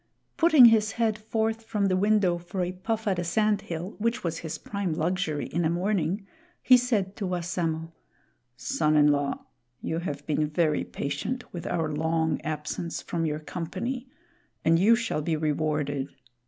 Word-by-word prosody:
Putting 315 -6 +7
his 215 -3 +5
head 225 -2 +1
forth 220 +1 -1
from 215 -2 -1
the 185 -1 +2
window 195 -3 +2
for 180 +2 -3
a 175 - -2
puff 220 +4 -3
at 190 -3 +1
a - - -1
sand 210 +4 +1
hill, 175 +4 -5
which 230 +3 0
was 165 -2 -2
his 160 -2 -5
prime 200 -5 -3
luxury 160 -2 -1
in 170 +2 -1
a 160 - +2
morning, 185 +1 0 0.4
he 255 - +8
said 220 -6 +1
to 200 - -2
Wassamo: 170 -2 -2 0.7
"Son 210 - +1
in 150 0 +6
law, 145 -1 -1 0.3
you 160 - -2
have 145 -5 -5
been 150 0 0
very 155 -1 +1
patient 145 - -3
with 175 -2 -5
our 160 -3 -1
long 160 +1 0
absence 155 +2 -4
from 165 -1 -2
your 150 -1 -1
company, 190 - -4 0.6
and 165 +1 +5
you 220 +5 +6
shall 230 -9 -2
be 160 +1 0
rewarded. 150 -2 -1
175 Hz, 170 wpm, -27 LUFS, 155-215 Hz, 0.7 s, he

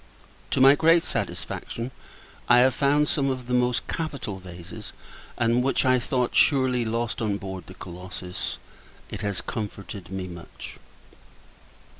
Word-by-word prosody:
To - - +1
my 135 +1 +9
great 165 +3 +5
satisfaction, 120 +3 -3 0.6
I 120 - +8
have 130 0 +5
found 145 +3 +3
some 140 -2 +1
of 130 -2 -3
the 125 - -3
most 125 -1 +2
capital 140 -11 -3
vases; 90 +4 -9 0.4
and 120 +1 +3
which 135 +1 +1
I 130 0 +5
thought, 125 0 -1
surely, 130 -4 +4
lost 115 +1 -2
on 105 -3 0
board 95 -3 -7
the 95 - -11
Colossus. 90 0 -6 0.5
It - - -5
has 100 -2 -1
comforted 100 -3 -6
me 95 -1 -4
much. 85 -1 -10
120 Hz, 140 wpm, -26 LUFS, 95-130 Hz, 0.6 s, my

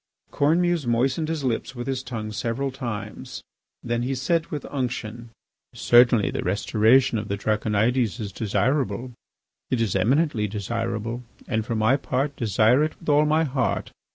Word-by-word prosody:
Cornemuse 165 0 +2
moistened 130 +7 +1
his 160 -3 -2
lips 130 +1 -2
with 120 0 -5
his 130 -1 -2
tongue 110 -4 -5
several 120 +5 -2
times. 110 -6 -6 0.4
Then 120 0 -1
he 130 +2 -1
said 165 +6 0
with 150 -3 -5
unction: 120 -3 -4 0.5
"Certainly 120 -3 +4
the - - -3
restoration 110 +5 +3
of 105 - -6
the 100 - -2
Draconides 110 +3 0
is 105 -3 -4
desirable; 120 +5 -1 0.6
it 130 - 0
is 110 -5 0
eminently 120 - +2
desirable; 115 +3 -3 0.3
and 110 -2 0
for 115 +1 -3
my 110 +5 +3
part, 140 +1 -2
desire 115 +3 +3
it 155 - -3
with 165 - -6
all 150 +1 +5
my 155 +2 +3
heart. 130 -5 -1
120 Hz, 155 wpm, -24 LUFS, 110-135 Hz, 0.6 s, all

